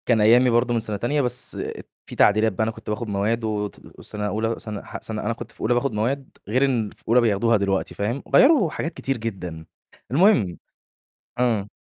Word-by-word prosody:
كان 115 Hz, -3 st, +3 dB
أيّامي 120 Hz, +4 st, +6 dB
برضه 120 Hz, +1 st, +2 dB
من 115 Hz, -, +2 dB
سَنة 110 Hz, -2 st, -3 dB
تانية 145 Hz, +7 st, 0 dB
بس 125 Hz, -2 st, 0 dB, 0.5 s
في -, -, -10 dB
تعديلات 110 Hz, +2 st, +4 dB
بقى 100 Hz, -, 0 dB
أنا 110 Hz, -, 0 dB
كنت 110 Hz, -, -11 dB
باخد 110 Hz, +2 st, -3 dB
مواد 105 Hz, +3 st, -1 dB
وت 105 Hz, -2 st, -5 dB
وسَنة 105 Hz, -1 st, -4 dB
أولى 110 Hz, +2 st, -1 dB
سَنة 105 Hz, -2 st, -6 dB
ح -, -, -8 dB
سَنة 110 Hz, -1 st, -4 dB
أنا 115 Hz, -, -1 dB
كنت 115 Hz, 0 st, -9 dB
في -, -, -16 dB
أولى 110 Hz, -, +2 dB
باخد 130 Hz, +3 st, 0 dB
مواد 130 Hz, +6 st, -1 dB, 0.2 s
غير 130 Hz, +6 st, +2 dB
إن 120 Hz, -6 st, 0 dB
في -, -, -20 dB
أولى 120 Hz, +2 st, +5 dB
بياخدوها 115 Hz, +1 st, +2 dB
دلوقتي 100 Hz, -1 st, -1 dB
فاهم، 115 Hz, +7 st, -2 dB
وغيّروا 270 Hz, -, +5 dB
حاجات 165 Hz, +2 st, -4 dB
كتير 135 Hz, -1 st, -3 dB
جدًا 90 Hz, -8 st, -6 dB, 0.5 s
المهم 135 Hz, -, +3 dB, 0.8 s
إمم. 115 Hz, -5 st, +1 dB
115 Hz, 200 wpm, -23 LUFS, 105-125 Hz, 0.8 s, أيّامي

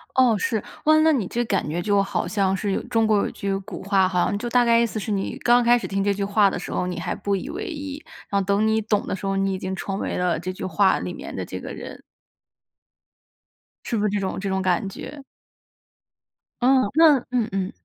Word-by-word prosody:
哦， 250 Hz, -5 st, +4 dB
是。 220 Hz, -, 0 dB, 0.3 s
哦 310 Hz, 0 st, +5 dB
那 320 Hz, 0 st, +5 dB
你 220 Hz, -9 st, 0 dB
这 240 Hz, +1 st, -1 dB
感 195 Hz, -7 st, -1 dB
觉 170 Hz, +3 st, -2 dB
就 200 Hz, 0 st, +2 dB
好 195 Hz, -3 st, -2 dB
像 195 Hz, 0 st, +1 dB
是 200 Hz, +1 st, -2 dB
有 -, -, -1 dB
中 225 Hz, -1 st, +1 dB
国 215 Hz, -1 st, +3 dB
有 -, -, 0 dB
句 195 Hz, -1 st, -2 dB
古 195 Hz, 0 st, -8 dB
话 195 Hz, -1 st, +3 dB
哈， 180 Hz, 0 st, +1 dB
就 240 Hz, +3 st, -4 dB
大 245 Hz, 0 st, +4 dB
概 230 Hz, 0 st, +5 dB
意 235 Hz, -, +3 dB
思 220 Hz, -1 st, -4 dB
是 210 Hz, -, -4 dB
你 195 Hz, -1 st, -2 dB
刚 240 Hz, 0 st, +5 dB
开 240 Hz, +1 st, +5 dB
始 -, -, -5 dB
听 195 Hz, 0 st, -1 dB
这 200 Hz, 0 st, +2 dB
句 200 Hz, 0 st, -3 dB
话 200 Hz, 0 st, +3 dB
的 -, -, -4 dB
时 -, -, -7 dB
候， 180 Hz, -, -1 dB
你 180 Hz, -, -4 dB
还 -, -, -2 dB
不 200 Hz, -1 st, -1 dB
以 230 Hz, +10 st, -5 dB
为 380 Hz, +6 st, -5 dB
意， 290 Hz, -4 st, -6 dB, 0.3 s
然 200 Hz, -, +1 dB
后 -, -, -4 dB
等 200 Hz, +2 st, +2 dB
你 220 Hz, 0 st, +2 dB
懂 210 Hz, -1 st, 0 dB
的 -, -, -1 dB
时 195 Hz, -, -7 dB
候， 195 Hz, 0 st, 0 dB
你 195 Hz, 0 st, 0 dB
已 -, -, -2 dB
经 190 Hz, 0 st, -4 dB
成 195 Hz, +2 st, -4 dB
为 -, -, -3 dB
了 180 Hz, -3 st, 0 dB
这 185 Hz, +2 st, -4 dB
句 185 Hz, -, -6 dB
话 190 Hz, +2 st, +2 dB
里 -, -, -5 dB
面 -, -, -8 dB
的 -, -, -4 dB
这 -, -, -6 dB
个 -, -, -7 dB
人。 -, -, -9 dB, 1.8 s
是 230 Hz, -, -2 dB
不 210 Hz, -, 0 dB
是 210 Hz, -, +2 dB
这 205 Hz, 0 st, -1 dB
种 190 Hz, 0 st, -3 dB
这 195 Hz, 0 st, -3 dB
种 190 Hz, 0 st, 0 dB
感 185 Hz, +1 st, +1 dB
觉？ 285 Hz, +8 st, -9 dB, 1.4 s
嗯， 255 Hz, -4 st, +4 dB
那 315 Hz, -3 st, +7 dB
嗯 240 Hz, -3 st, +1 dB
嗯。 190 Hz, -1 st, -2 dB
200 Hz, 265 characters per minute, -23 LUFS, 190-235 Hz, 1.8 s, 那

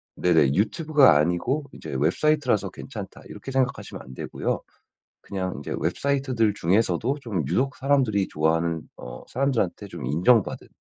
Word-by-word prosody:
네네, 80 Hz, -6 st, +3 dB
'유튜브가 135 Hz, -, +4 dB
아니고 90 Hz, -, 0 dB
이제 -, -, -8 dB
웹사이트라서 125 Hz, -, +2 dB
괜찮다.' -, -, -9 dB
이렇게 135 Hz, -, -8 dB
생각하시면 130 Hz, -2 st, -1 dB
안되고요. 65 Hz, 0 st, -4 dB, 0.6 s
그냥 95 Hz, -2 st, -4 dB
이제 -, -, -5 dB
웹사이트들 125 Hz, -, 0 dB
중에서도 105 Hz, -, +1 dB
좀 105 Hz, -, -2 dB
유독 135 Hz, -, 0 dB
사람들이 130 Hz, -8 st, +2 dB
좋아하는 80 Hz, +1 st, 0 dB, 0.2 s
어 60 Hz, -, -9 dB
사람들한테 130 Hz, -8 st, -1 dB
좀 -, -, -7 dB
인정받은 90 Hz, -, +2 dB
105 Hz, 370 characters per minute, -25 LUFS, 85-135 Hz, 0.6 s, 유튜브가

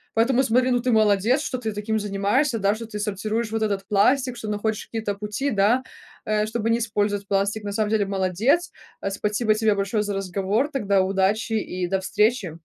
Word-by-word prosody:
Поэтому 250 Hz, +3 st, +3 dB
смотри, 255 Hz, +1 st, +2 dB
ну 245 Hz, -, +2 dB
ты 250 Hz, -, 0 dB
молодец, 215 Hz, +5 st, +3 dB
что 260 Hz, -4 st, -3 dB
ты 220 Hz, -3 st, -3 dB
таким 215 Hz, +1 st, -2 dB
занимаешься, 210 Hz, +6 st, 0 dB
да, 200 Hz, +1 st, +2 dB
что 230 Hz, +1 st, -7 dB
ты 210 Hz, -2 st, -6 dB
сортируешь 215 Hz, +2 st, -2 dB
вот 225 Hz, -, -2 dB
этот 200 Hz, -2 st, -1 dB
пластик, 245 Hz, +4 st, +2 dB
что 220 Hz, -, -6 dB
находишь 210 Hz, 0 st, -2 dB
какие-то 220 Hz, -3 st, -3 dB
пути, 210 Hz, +7 st, -3 dB
да, 215 Hz, +5 st, +2 dB, 0.4 s
э, 215 Hz, 0 st, +1 dB
чтобы 225 Hz, 0 st, -2 dB
не 230 Hz, +1 st, +2 dB
использовать 205 Hz, -2 st, -1 dB
пластик. 200 Hz, +2 st, 0 dB
На 205 Hz, -, -4 dB
самом 215 Hz, -1 st, 0 dB
деле, 215 Hz, -2 st, +2 dB
молодец, 195 Hz, -, +1 dB, 0.3 s
а, 195 Hz, -, -2 dB
спасибо 210 Hz, +2 st, 0 dB
тебе 215 Hz, -1 st, +2 dB
большое 200 Hz, +2 st, 0 dB
за 205 Hz, -1 st, -3 dB
разговор, 195 Hz, +7 st, -1 dB
тогда 200 Hz, -7 st, +1 dB
удачи 195 Hz, +4 st, 0 dB
и 185 Hz, -4 st, -2 dB
до 190 Hz, +1 st, 0 dB
встречи. 200 Hz, -3 st, 0 dB
210 Hz, 195 wpm, -23 LUFS, 200-230 Hz, 0.4 s, Поэтому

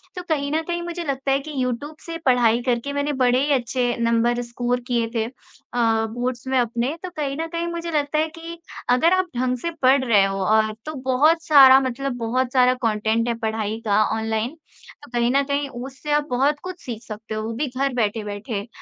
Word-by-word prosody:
तो 360 Hz, -, -5 dB
कहीं 285 Hz, -2 st, 0 dB
न 315 Hz, +1 st, +1 dB
कहीं 345 Hz, +1 st, -3 dB
मुझे 345 Hz, 0 st, -5 dB
लगता 275 Hz, -2 st, -2 dB
है 270 Hz, -, +3 dB
कि 305 Hz, +2 st, -8 dB
यूट्यूब 255 Hz, +5 st, -3 dB
से 330 Hz, -1 st, -5 dB
पढ़ाई 245 Hz, -2 st, +4 dB
करके 250 Hz, +2 st, -1 dB
मैंने 285 Hz, +1 st, -1 dB
बड़े 245 Hz, +1 st, +3 dB
ही 295 Hz, -, 0 dB
अच्छे 245 Hz, -1 st, 0 dB
नंबर 235 Hz, +1 st, +2 dB
स्कोर 245 Hz, +1 st, -2 dB
किए 235 Hz, -2 st, +1 dB
थे 225 Hz, -1 st, +1 dB, 0.5 s
अ, 225 Hz, -2 st, +2 dB
बोर्ड्स 245 Hz, +2 st, -3 dB
में 260 Hz, 0 st, +1 dB
अपने। 240 Hz, +4 st, -1 dB
तो 365 Hz, -, -4 dB
कहीं 295 Hz, -5 st, -3 dB
न 325 Hz, +1 st, -2 dB
कहीं 335 Hz, 0 st, -1 dB
मुझे 340 Hz, 0 st, -4 dB
लगता 295 Hz, -1 st, 0 dB
है 315 Hz, -, +2 dB
कि, 335 Hz, +1 st, -8 dB, 0.3 s
अगर 255 Hz, +8 st, +4 dB
आप 370 Hz, 0 st, +2 dB
ढंग 250 Hz, +1 st, 0 dB
से 335 Hz, +8 st, -3 dB
पढ़ 260 Hz, +1 st, +5 dB
रहे 220 Hz, -6 st, +4 dB
हो 195 Hz, 0 st, -2 dB
और 215 Hz, +2 st, +2 dB
तो 310 Hz, -, -5 dB
बहुत 305 Hz, +6 st, +4 dB
सारा 270 Hz, -4 st, +8 dB
मतलब 270 Hz, +1 st, -2 dB
बहुत 245 Hz, +2 st, -1 dB
सारा 255 Hz, -1 st, +5 dB
कंटेंट 220 Hz, +1 st, +1 dB
है 235 Hz, -, +1 dB
पढ़ाई 220 Hz, -1 st, -2 dB
का 210 Hz, 0 st, +3 dB, 0.2 s
ऑनलाइन, 220 Hz, +5 st, -2 dB, 0.5 s
तो 290 Hz, -, -14 dB
कहीं 240 Hz, 0 st, +1 dB
न 275 Hz, +2 st, +3 dB
कहीं 280 Hz, 0 st, -1 dB
उससे 265 Hz, +4 st, -7 dB
आप 295 Hz, 0 st, +3 dB
बहुत 275 Hz, +4 st, +1 dB
कुछ 365 Hz, -1 st, -7 dB
सीख 230 Hz, -3 st, -5 dB
सकते 215 Hz, 0 st, -7 dB
हो, 215 Hz, -, -2 dB
वो 225 Hz, -, -3 dB
भी 285 Hz, +6 st, -2 dB
घर 265 Hz, +1 st, -1 dB
बैठे-बैठे। 210 Hz, -1 st, -2 dB
255 Hz, 210 wpm, -22 LUFS, 230-290 Hz, 0.5 s, सारा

